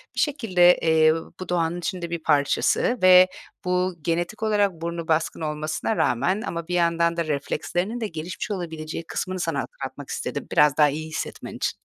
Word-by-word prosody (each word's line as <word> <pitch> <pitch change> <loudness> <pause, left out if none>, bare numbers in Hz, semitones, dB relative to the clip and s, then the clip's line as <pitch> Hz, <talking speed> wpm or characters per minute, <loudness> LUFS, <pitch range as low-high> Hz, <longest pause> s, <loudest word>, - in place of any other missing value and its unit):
bir - - -3
şekilde, 185 - +4
eee, 160 -1 +4 0.3
bu 185 - -7
doğanın 170 0 0
içinde 175 -2 -4
bir 170 -1 -4
parçası 150 - +2
ve 185 0 +8 0.4
bu 180 0 0
genetik 175 +6 -2
olarak 205 -2 +2
burnu 170 0 -5
baskın 160 +1 0
olmasına 155 +7 -2
rağmen 185 - +1
ama 170 -7 -5
bir 180 - -4
yandan 170 -1 +2
da 170 - 0
reflekslerinin 175 - -2
de 220 - -1
gelişmiş 170 +3 -6
olabileceği 165 -4 -5
kısmını 185 0 -3
sana - - -1
hatırlatmak - - -8
istedim - - -4
biraz 150 -1 +4
daha 150 -1 +6
iyi 155 +3 -4
hissetmen 155 - -5
için. - - -2
170 Hz, 165 wpm, -24 LUFS, 160-185 Hz, 0.4 s, ve